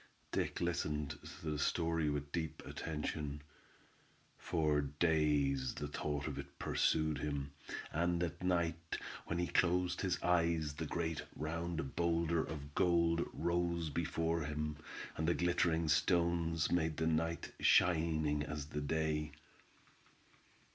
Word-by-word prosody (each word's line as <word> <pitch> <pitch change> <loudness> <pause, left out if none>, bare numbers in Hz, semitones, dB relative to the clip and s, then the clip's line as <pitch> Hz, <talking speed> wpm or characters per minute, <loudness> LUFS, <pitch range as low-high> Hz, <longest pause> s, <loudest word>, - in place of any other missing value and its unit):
Dick - - -1
listened 75 -4 -1 0.2
to 80 - -2
the 75 - -2
story 80 0 +1
with 75 0 -3
deep 80 -1 -3
attention. 75 -2 -4 1.0
For 75 -3 +2
days 75 -3 +2
the 75 - -3
thought 75 0 -2
of 70 -2 -4
it 70 0 -9
pursued 80 -2 +1
him, 70 -1 -2 0.4
and 85 +2 +1
at 85 0 -3
night 85 -2 0 0.3
when 85 - -1
he 90 - +1
closed 90 0 +2
his 95 -2 0
eyes 85 -4 +2
the 80 +2 -4
great 80 0 -1
round 80 -1 -3
boulder 85 -1 +2
of 70 -2 -7
gold 85 -1 +3
rose 85 -1 0
before 80 +1 0
him, 75 0 -2 0.4
and 80 - 0
the 85 - +3
glittering 85 -2 +2
stones 85 0 +2
made 80 -3 +1
the 80 - +1
night 80 +1 0
shining 80 -4 +4
as 75 -1 -4
the 75 -1 -3
day. 75 0 0
80 Hz, 125 wpm, -36 LUFS, 75-85 Hz, 1.0 s, shining